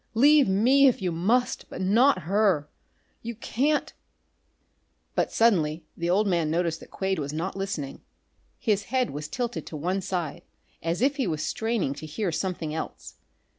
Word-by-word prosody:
Leave 285 +4 +6
me, 255 +8 +5
if 255 - +2
you 185 -3 -1
must, 215 +10 0
but - - -7
not 200 +2 +3
her! 190 -4 +2 0.5
You 235 0 -5
can't 275 +7 0 0.6
" - - -45
But - - +1
suddenly 165 -8 +2
the 170 0 -2
old 200 +4 +3
man 170 -5 +1
noticed 165 0 0
that - - -13
Quade 190 -2 -2
was 140 -1 -3
not 165 +6 -3
listening. 195 -8 -4 0.6
His 205 -3 0
head 255 0 0
was 150 +2 -5
tilted 245 +7 -4
to 155 - -6
one 180 +6 -1
side 180 -5 -3 0.4
as 170 +7 -1
if 280 +2 +2
he 265 - 0
was 155 -3 -2
straining 225 - -1
to 155 +2 -8
hear 175 +4 -2
something 165 -3 -3
else. 160 - -6
190 Hz, 170 wpm, -26 LUFS, 165-230 Hz, 0.6 s, Leave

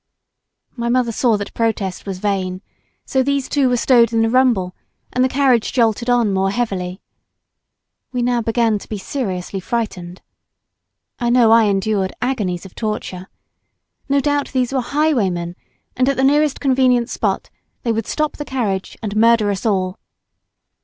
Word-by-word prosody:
My 235 -1 -2
mother 245 -1 +2
saw 230 -1 +2
that 205 - -6
protest 210 -5 -2
was 190 -2 -3
vain, 190 -1 -2 0.4
so 265 - +1
these 280 0 0
two 275 -3 +2
were 245 - +2
stowed 235 -2 +4
in 225 -1 +2
the 225 - +1
rumble, 235 -8 +2 0.4
and 250 - +2
the 260 - +2
carriage 255 -4 +2
jolted 235 0 +1
on 235 -4 +3
more 190 0 +1
heavily. 195 -4 -3 1.1
We 250 -1 -1
now 245 -1 +1
began 225 -1 +1
to - - -14
be 215 - -3
seriously 195 -4 -4
frightened. 185 -4 -4 1.0
I 240 -2 0
know 240 -2 +5
I 225 -1 +6
endured 195 -1 0
agonies 210 -9 -2
of 190 - -12
torture. 200 -4 -4 0.8
No 280 0 +3
doubt 290 0 0
these 255 0 0
were 265 - +1
highwaymen, 220 - 0 0.4
and 255 +2 +2
at 275 - 0
the 265 - +1
nearest 290 +1 +3
convenient 255 -3 +2
spot - - -2 0.3
they 235 - +1
would 225 -1 -2
stop 305 -1 -1
the 295 - -4
carriage 215 -9 -3
and 210 -1 -3
murder 225 -1 +4
us 200 +3 -2
all. 185 -3 -1
230 Hz, 160 wpm, -19 LUFS, 195-255 Hz, 1.1 s, I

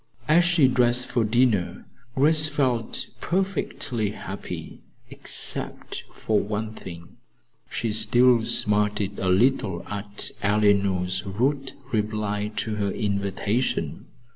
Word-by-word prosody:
As 165 +3 +5
she 170 -5 +4
dressed 125 0 +1
for 120 -2 +1
dinner, 110 -4 +1 0.3
Grace 155 +3 +3
felt 130 -6 -1
perfectly 165 - -1
happy 105 - -7 0.3
except - - +1
for 110 -2 0
one 110 +1 -3
thing. 85 -5 -11 0.5
She 115 - -2
still 115 +2 +4
smarted 105 -1 +1
a 95 - 0
little 95 -3 +1
at 105 0 -2
Eleanor's 100 -3 +2
rude 135 +8 -1 0.2
reply 105 -1 -1
to 110 -1 -2
her 100 -1 0
invitation. 100 +3 -2
110 Hz, 105 wpm, -24 LUFS, 100-125 Hz, 0.5 s, As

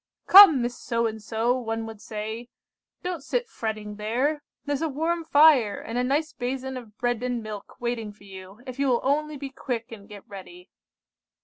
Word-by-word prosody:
"'Come, 360 -10 +9
Miss 240 0 -2
So 235 -1 -1
and 220 -1 -3
So,' 225 +3 0
one 225 -1 -3
would 220 -2 -9
say, 220 +2 -6 0.5
'don't 360 -4 -3
sit 485 +10 -1
fretting 215 - -5
there; 255 +8 0 0.2
there's 290 0 -2
a 325 - 0
warm 325 +4 -1
fire, 290 -9 +5
and 225 - -7
a 245 - +1
nice 295 +5 0
basin 260 +1 -4
of 230 -4 -10
bread 245 -2 -1
and 245 -2 -2
milk 210 -2 -8
waiting 235 -3 -3
for 205 0 -20
you, 195 +2 -12
if 255 0 -8
you 280 - +2
will 245 -2 +2
only 300 +2 0
be 275 -1 -7
quick 245 -4 -5
and 210 -2 -11
get 205 -2 -12
ready. 345 - -12
245 Hz, 190 wpm, -26 LUFS, 220-285 Hz, 0.5 s, Come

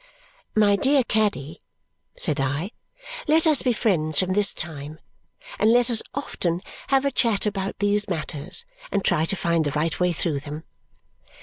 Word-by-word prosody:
"My 210 -2 +4
dear 270 +6 +3
Caddy," 210 - -1 0.6
said 150 - 0
I, 145 +9 -1 0.6
"let 315 +2 +3
us 310 -3 +5
be 255 - +1
friends 160 -10 0
from 185 0 +1
this 205 0 +4
time, 155 -2 -6 0.6
and 220 - +4
let 245 +1 +3
us 225 - +3
often 175 -11 -2 0.3
have 270 0 +2
a 280 - +1
chat 230 -6 +1
about 195 -2 -2
these 205 +1 +1
matters 160 - -2 0.3
and 200 -1 -1
try 155 - +2
to 195 - -1
find 170 -3 +1
the 145 - 0
right 160 +2 -1
way 180 0 +2
through 155 -3 0
them." 150 +2 -8
195 Hz, 165 wpm, -24 LUFS, 155-220 Hz, 0.6 s, us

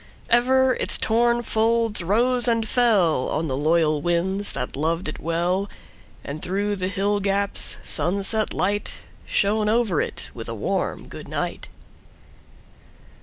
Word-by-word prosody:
Ever 260 +2 +4
its - - -2
torn 235 +1 +2
folds 225 -1 +2
rose 240 +7 +1
and 230 -1 +2
fellOn 185 - +2
the 130 - -2
loyal 155 +1 +2
winds 185 +5 -1
that 125 - -4
loved 165 +4 -1
it 155 - -6
well; 175 +4 -1 0.5
And 150 +2 -6
through 200 +2 -1
the 185 -1 -2
hill 200 +2 0
gaps 200 0 -1
sunset 195 +7 0
lightShone 205 +1 -1
over 220 -8 +2
it - - -5
with - - -7
a - - -4
warm - - -2
good - - -9
night. - - -4
200 Hz, 125 wpm, -23 LUFS, 170-225 Hz, 0.5 s, Ever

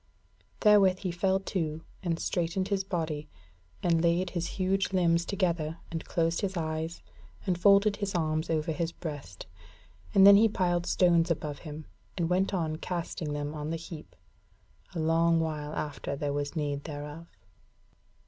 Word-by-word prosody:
Therewith 200 -4 +6
he 185 - -2
fell 190 +2 +1
to, 160 -5 -3 0.2
and 170 -3 -1
straightened 180 +2 -1
his 195 -1 +1
body, 160 -5 -3 0.5
and 165 -2 +3
laid 175 +2 +2
his 170 -1 -2
huge 190 0 +1
limbs 170 -2 +3
together 170 -5 -1
and 165 -1 -3
closed 165 0 0
his 195 -2 -2
eyes 160 0 -3 0.4
and 185 -3 +1
folded 200 +3 +5
his 200 -2 -3
arms 155 -1 0
over 160 0 0
his 165 +1 -2
breast; 145 - -7 0.7
and 195 -1 +8
then 200 0 +10
he 220 +2 +5
piled 175 -3 0
the - - -3
stones 175 -2 +4
above 150 -3 -2
him, 155 -1 -8 0.3
and 170 -2 0
went 190 +2 +2
on 160 -5 -1
casting 170 -3 -4
them 145 0 -3
on 150 0 -4
the 165 - -1
heap 160 -1 -10 0.8
a - - -2
long 165 +1 +3
while 155 -2 -2
after 145 -1 -3
there 145 0 -2
was 145 +2 -3
need 145 -2 -2
thereof. 150 +2 -7
170 Hz, 160 wpm, -29 LUFS, 155-185 Hz, 0.8 s, then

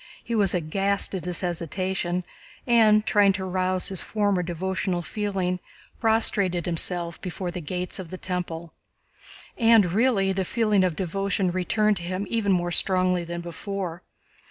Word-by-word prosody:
He 235 - -5
was 205 -4 +4
aghast 195 +5 0
at 180 -3 -4
his 180 -1 -1
hesitation 180 +1 -2 0.4
and, 220 -3 +5
trying 205 -2 +4
to 190 0 -4
arouse 185 0 0
his 190 -2 -2
former 205 -4 0
devotional 180 +1 -2
feeling, 190 -2 -2 0.4
prostrated 200 -6 +2
himself 170 0 +1
before 180 -1 -4
the 175 0 -5
Gates 180 +5 -4
of 180 -3 -7
the 185 - -6
Temple. 170 -3 -5 0.9
And 225 -6 +5
really, 210 -3 +2
the 190 0 -1
feeling 210 -1 +2
of 180 -4 0
devotion 195 +1 -1
returned 205 +3 +1
to 175 - -5
him 185 +3 -3
even 220 -4 +1
more 175 -1 +1
strongly 185 0 +2
than 170 0 -5
before. 175 0 -5
185 Hz, 150 wpm, -25 LUFS, 175-200 Hz, 0.9 s, and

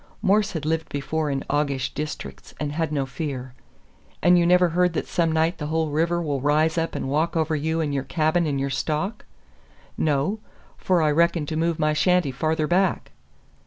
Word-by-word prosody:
Morse 205 +1 +2
had 160 -3 -4
lived 160 +1 -1
before 150 +2 -2
in 135 -1 -2
aguish 140 -3 -1
districts, 150 +1 -6
and 150 -1 -2
had 160 0 -2
no 140 -3 0
fear. 130 -3 -5 0.7
"And 175 +2 +6
you 170 -1 +4
never 180 0 +5
heard 180 +1 +2
that - - -2
some 165 -2 0
night 160 +3 +1
the 150 - -3
whole 160 0 -1
river 165 +3 +1
will 145 -4 -2
rise 155 +3 +2
up 165 -1 -1
and - - -3
walk 155 +5 0
over 160 0 +1
you 160 +2 -1
and 150 -2 -1
your 140 - 0
cabin 155 +4 +1
and 140 -2 -1
your 135 0 -2
stock?" 155 - -2 0.7
"No. 155 +8 +1 0.4
For 180 -3 +1
I 150 - +3
reckon 170 0 +2
to 155 - -4
move 165 0 0
my 155 -1 +1
shanty 180 -1 +2
farther 155 +4 0
back." 180 +3 +1
155 Hz, 195 wpm, -24 LUFS, 145-170 Hz, 0.7 s, And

